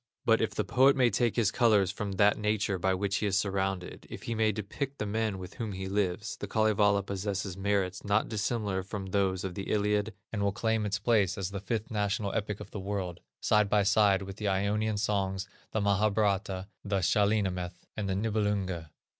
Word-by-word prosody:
]; - - -56
but - - +4
if - - -1
the - - +1
poet 135 +2 +4
may 125 -3 +4
take 120 +2 +1
his 110 -4 +2
colors 105 -6 +3
from 100 0 -4
that 100 +2 +4
nature 105 -2 0
by 95 +2 +2
which 100 +2 0
he 105 - 0
is 95 -1 +2
surrounded, 95 -2 -2
if - - -8
he 115 - -2
may 110 -1 +2
depict 130 +7 -4
the 105 - -2
men 110 -1 -1
with 95 0 -8
whom 110 -4 -3
he 95 0 -5
lives, 100 0 -1
the - - -5
Kalevala 105 -2 +3
possesses 100 -1 -3
merits 95 -2 -1
not 105 +1 +2
dissimilar 105 -3 -1
from 95 +1 -5
those 95 -1 0
of 95 -2 -3
the 100 0 -5
Iliad, 105 0 +1 0.2
and 105 - -1
will 100 0 +2
claim 110 -1 0
its 100 0 0
place 105 -2 +2
as 95 -1 -3
the 100 - -4
fifth 110 +2 -3
national 105 -1 -1
epic 105 -2 -2
of 105 -1 -9
the 105 - -5
world, 95 -3 -3 0.2
side 105 -1 +3
by 105 0 +3
side 100 -1 +4
with 95 +1 -8
the 105 - -2
Ionian 105 +2 +1
Songs, 100 -2 0 0.2
with - - -31
the 110 - +1
Mahabharata, 100 -1 +1 0.2
the 100 -2 0
Shahnameth, 90 -2 +1
and 105 -3 -3
the 95 - 0
Nibelunge." 100 -5 -1
100 Hz, 205 wpm, -30 LUFS, 95-105 Hz, 0.2 s, but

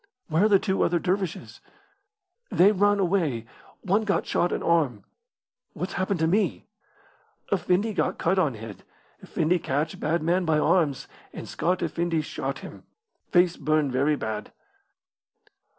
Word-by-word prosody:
"Where 165 +6 +3
are - - +3
the 200 - +6
two 190 0 -1
other 175 - +2
dervishes?" 180 - -3 0.9
"They 195 +4 +5
ran 205 0 +3
away. 170 - 0 0.4
One 200 +3 +2
got 200 -2 0
shot 175 - 0
in - - -2
arm." 150 -11 +1 0.7
"What's 180 +2 -5
happened 185 0 -1
to 160 - +3
me?" 205 +6 0 0.9
"Effendi 195 +3 +1
got - - -1
cut 190 +2 +1
on 145 -9 +1
head. 105 -3 -9 0.4
Effendi 170 +3 0
catch 150 0 -2
bad 160 +2 0
man 175 +3 +1
by 160 -2 +2
arms, 150 -3 +1 0.3
and - - -8
Scott 180 +1 -1
effendi 165 0 -1
shot 150 - -5
him. - - -11 0.5
Face 175 -1 +3
burn 155 -2 +1
very 140 +4 +2
bad." 110 -5 -5
170 Hz, 145 wpm, -26 LUFS, 150-190 Hz, 0.9 s, the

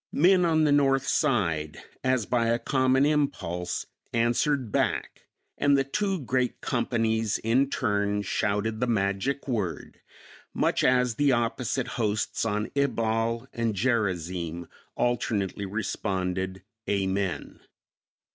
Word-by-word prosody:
Men 180 +3 +4
on 160 -2 +3
the 150 - +3
north 135 -2 +3
side, 85 - 0 0.2
as 130 -4 +1
by 120 0 +1
a 115 +1 +2
common 130 +2 +2
impulse, 90 - -1 0.3
answered 120 +2 +1
back, - - -1 0.3
and 140 0 +4
the 135 - +2
two 195 +6 -1
great 125 -1 -1
companies 115 -3 0
in 130 +5 +2
turn 105 -4 0
shouted 105 +2 -1
the 125 - 0
magic 105 +6 -1
word, 105 -9 -3 0.5
much - - +1
as 125 -1 +3
the 145 -1 +3
opposite 120 +1 0
hosts 110 +1 0
on 105 0 -1
Ebal 115 -3 0
and 115 -2 -1
Gerazim 90 -7 -1 0.3
alternately 105 -5 -1
responded, 95 -2 -2 0.3
"Amen." 95 -1 -1
115 Hz, 115 wpm, -27 LUFS, 100-130 Hz, 0.5 s, Men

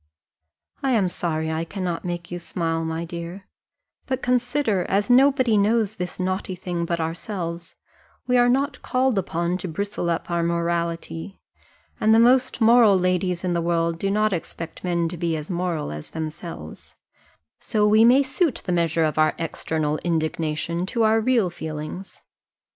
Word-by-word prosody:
I 270 -2 +1
am 205 -5 +3
sorry 160 -3 -2
I 160 +1 -1
cannot 175 -1 -4
make 175 -1 -5
you 175 - -4
smile, 165 -1 -2
my 160 +1 -3
dear; 170 +3 -7 0.6
but 260 0 -2
consider, 245 -5 +1
as 200 +4 +1
nobody 260 -4 +5
knows 220 0 +1
this 180 0 -5
naughty 185 0 -2
thing 175 -1 -3
but 170 0 -2
ourselves, 170 +1 -4 0.5
we 250 0 +1
are 245 0 +5
not 270 +2 0
called 255 -4 +1
upon 175 0 -2
to 185 - -5
bristle 180 +1 -3
up 170 +1 -2
our 170 0 +1
morality, 170 - -2 0.6
and 220 +1 +4
the - - +6
most 255 +1 +4
moral 225 -3 +6
ladies 180 0 0
in 180 -1 0
the 170 - 0
world 165 0 0
do 195 - 0
not 215 +1 +2
expect 165 -1 -6
men 170 -2 0
to 175 +1 -5
be 165 -1 -1
as 155 +4 -6
moral 170 -4 -2
as 75 0 -8
themselves: 160 - -7 0.6
so 210 -1 +1
we 215 +1 +6
may 255 +4 +6
suit 275 +1 -1
the 180 - -2
measure 165 -2 +1
of 155 0 0
our 155 0 +3
external 155 -1 -2
indignation 165 +1 -1
to 230 +2 0
our 220 +1 +4
real 225 -6 +2
feelings. 160 +3 -7
175 Hz, 165 wpm, -23 LUFS, 165-215 Hz, 0.6 s, the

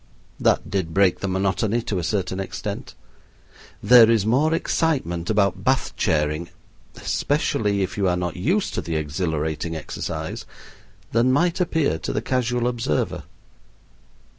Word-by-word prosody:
That - - +2
did 90 -5 -2
break 95 -2 +3
the 100 - -3
monotony 100 +4 0
to 100 -5 -2
a - - -3
certain 95 0 -1
extent. 95 - -5 0.9
There 115 +1 +8
is 115 -3 +3
more 135 +8 +3
excitement 130 - 0
about 100 -3 +1
Bath - - +1
chairing 75 +2 0 0.5
especially 105 -8 0
if 95 - -4
you 100 - +2
are 90 0 +1
not 90 -2 -3
used 180 - 0
to - - -2
the 85 - -4
exhilarating 80 +1 -2
exercise 80 - -5 0.6
than 120 +3 +3
might 170 +6 +2
appear 160 - +1
to - - -3
the 105 - -1
casual 125 -1 0
observer. 115 -11 -1
100 Hz, 140 wpm, -23 LUFS, 85-120 Hz, 0.9 s, There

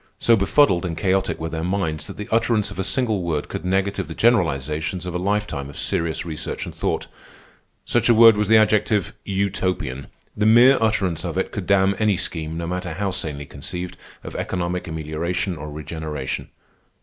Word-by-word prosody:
So 115 - +4
befuddled 100 -2 +3
and 85 -3 -3
chaotic 95 0 +1
were 80 +1 -3
their 80 0 -4
minds 80 -5 -2
that - - -9
the 105 - -6
utterance 110 -2 +2
of 100 - -8
a - - +1
single 110 -2 +1
word 80 -4 -2
could - - -5
negative 95 +2 0
the - - -7
generalizations 80 - +1
of 90 - -4
a 90 - -1
lifetime 100 -7 -1
of 70 - -10
serious 80 +1 -1
research 80 -3 -4
and - - -8
thought. - - -2 0.8
Such 120 0 +1
a - - +7
word 115 0 +8
was 105 0 0
the 110 +1 +6
adjective 105 -2 +2
Utopian. 95 -9 -2 0.3
The 105 +1 +2
mere 120 +4 +7
utterance 100 -6 +1
of - - -4
it - - -1
could - - -5
damn 100 0 +3
any 105 -3 +2
scheme, 80 -2 -3
no 85 - -3
matter 90 0 -3
how 100 +3 -2
sanely 75 -5 -3
conceived, 90 +7 -6 0.3
of - - -8
economic 90 0 -2
amelioration 80 +4 -2
or 75 -1 -7
regeneration. 75 -2 -5
90 Hz, 185 wpm, -22 LUFS, 80-105 Hz, 0.8 s, word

